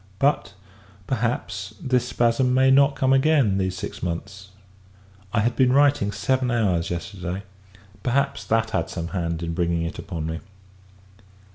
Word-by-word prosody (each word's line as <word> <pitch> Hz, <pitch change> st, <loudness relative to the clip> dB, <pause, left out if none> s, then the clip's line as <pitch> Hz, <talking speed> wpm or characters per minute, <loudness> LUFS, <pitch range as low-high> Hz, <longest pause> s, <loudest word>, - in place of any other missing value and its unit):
But, 135 Hz, -5 st, +1 dB, 0.5 s
perhaps, 110 Hz, -5 st, -2 dB
this 130 Hz, -1 st, 0 dB
spasm 120 Hz, +2 st, +2 dB
may 130 Hz, 0 st, +5 dB
not 140 Hz, +1 st, +5 dB
come 135 Hz, 0 st, +2 dB
again 135 Hz, -8 st, +3 dB
these 95 Hz, -1 st, -1 dB
six -, -, -6 dB
months. 95 Hz, +3 st, -5 dB, 0.8 s
I 115 Hz, -, +2 dB
had 120 Hz, +2 st, 0 dB
been 130 Hz, -2 st, +4 dB
writing 140 Hz, -6 st, +3 dB
seven 130 Hz, +4 st, 0 dB
hours 100 Hz, -8 st, +1 dB
yesterday; 90 Hz, +2 st, -5 dB, 0.6 s
perhaps, 135 Hz, -3 st, 0 dB
that 110 Hz, +1 st, +1 dB
had -, -, -1 dB
some 85 Hz, -1 st, -4 dB
hand 85 Hz, -2 st, -2 dB
in 85 Hz, 0 st, -3 dB
bringing 85 Hz, -1 st, 0 dB
it 85 Hz, -, -5 dB
upon 80 Hz, -2 st, -5 dB
me. 80 Hz, 0 st, -3 dB
110 Hz, 145 wpm, -24 LUFS, 90-130 Hz, 0.8 s, may